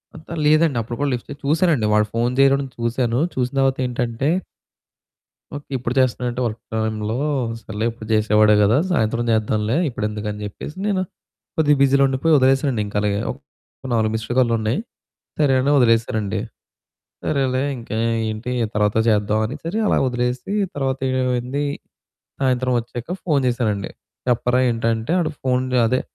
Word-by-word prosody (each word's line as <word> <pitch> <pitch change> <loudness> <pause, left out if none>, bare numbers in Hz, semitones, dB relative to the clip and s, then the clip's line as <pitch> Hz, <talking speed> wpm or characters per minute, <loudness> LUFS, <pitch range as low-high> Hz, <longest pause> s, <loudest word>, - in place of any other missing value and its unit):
అంత 160 - -13 0.2
లేదండి 155 -3 +4
అప్పుడు 115 +2 -6
కూడా 145 -1 +1
లిఫ్ట్ 120 - -5
చే - - -5
చూసానండి. 155 -6 +2
వాడు 105 0 +3
ఫోను 120 +2 0
చేయడం 135 0 +5 0.2
చూసాను 120 +1 0 0.2
చూసిన 125 0 -1
తర్వాత 135 0 +2
ఏంటంటే 120 +2 -1 1.3
ఓకే 145 - -9
ఇప్పుడు 120 0 -3
చేస్తున్నాడెంటి 125 0 0
వర్క్ 110 0 -4
టైమ్‌లో 110 +1 -1 0.4
సర్లే 110 +2 -4
ఎప్పుడు 110 -2 -11
చేసేవాడే 105 0 +4
కదా! 110 +6 +4
సాయంత్రం 115 -5 +1
చేద్దాంలే 110 +1 +1
ఇప్పుడెందుకు 105 -2 -4
అని 105 - -7
చెప్పేసి 125 - -8
నేను 190 -2 +1 0.6
కొద్దిగా 150 -2 +4
బిజీలో 140 0 +4
ఉండిపోయి, 135 +5 +1
వదిలేసానండి 135 -3 +2
ఇంకా 105 - -4
అలాగే. 100 -1 0
ఒక - - -11 0.5
4 110 -1 +2
మిస్డ్ 110 +2 -3
కాల్లు 120 -2 +3
ఉన్నాయి. 110 - 0 0.6
సరే 140 -3 +4
అని 140 +2 +2
వదిలేసానండి. 110 -4 +2 0.9
సరేలే 135 -2 +1
ఇంకా 115 -2 -6 0.3
ఏంటి 110 +3 -4 0.2
తర్వాత 105 0 +1
చేద్దాం 105 0 +2
అని 125 - -4
సరే 175 +6 -2
అలా - - +3
వదిలేసి, 125 +8 -2 0.2
తర్వాత 135 -1 -1 0.2
ఏమైంది 125 +3 -1 0.8
సాయంత్రం 130 -1 +1
వచ్చాక 120 +3 -8 0.2
ఫోను 145 -6 +2
చేశానండి. 110 -5 -1 0.4
చెప్పరా 125 +1 +2
ఏంటంటే 115 +4 -1
వాడు 160 -2 0
ఫోను 130 0 0
అదే 130 +3 +1
120 Hz, 145 wpm, -21 LUFS, 110-135 Hz, 1.3 s, చేయడం